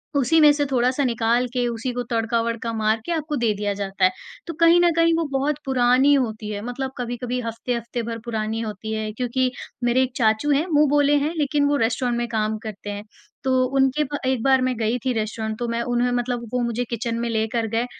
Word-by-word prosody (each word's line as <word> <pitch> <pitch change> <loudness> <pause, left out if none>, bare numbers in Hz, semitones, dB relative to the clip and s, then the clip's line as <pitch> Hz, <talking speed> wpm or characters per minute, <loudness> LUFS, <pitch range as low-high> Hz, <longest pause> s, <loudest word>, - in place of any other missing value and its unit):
उसी 280 +4 +3
में 300 -1 +8
से 290 0 0
थोड़ा-सा 255 +1 +1
निकाल 235 0 +1
के 245 -1 0
उसी 235 +2 -3
को 245 0 -2
तड़का-वडका 230 0 -1
मार 220 0 +1
के - - -3
आपको 310 -2 -2
दे 235 -3 +1
दिया 205 0 -1
जाता 195 -1 0
है। 185 - +4 0.4
तो 335 - -4
कहीं 335 +1 +6
न 345 -1 +4
कहीं 330 0 +4
वो 330 - +1
बहुत 275 +2 0
पुरानी 260 +1 +4
होती 220 -6 -1
है, 205 -1 -4
मतलब 260 +2 -4
कभी-कभी 245 0 -3
हफ़्ते-हफ़्ते 235 +1 -3
भर 230 0 -5
पुरानी 220 -1 -2
होती 220 0 -5
है 215 0 -3
क्योंकि 250 +2 0 0.3
मेरे 245 +2 +3
एक 260 - -3
चाचू 220 +4 +2
हैं 285 +4 +2
मुँह 300 0 +4
बोले 290 0 +3
हैं 315 - -2
लेकिन 290 -1 +1
वो 290 - +2
रेस्टोरेंट 240 +1 0
में 240 0 -1
काम 215 -1 -1
करते 210 -2 -7
हैं। 205 0 -5 0.4
तो 260 -1 +2
उनके 270 +3 +3
प 290 0 -4
एक 260 -2 +1
बार 265 -1 +4
मैं 255 0 0
गई 225 +2 0
थी 255 +2 -1
रेस्टोरेंट 220 0 -3
तो 240 - -2
मैं 235 0 -1
उन्होंने 245 +1 0
मतलब 245 -1 -2
वो 250 - +1
मुझे 235 +1 -1
किचन 235 0 -2
में 235 0 -2
लेकर 225 +1 -1
गए 230 +2 0
240 Hz, 220 wpm, -23 LUFS, 225-265 Hz, 0.4 s, में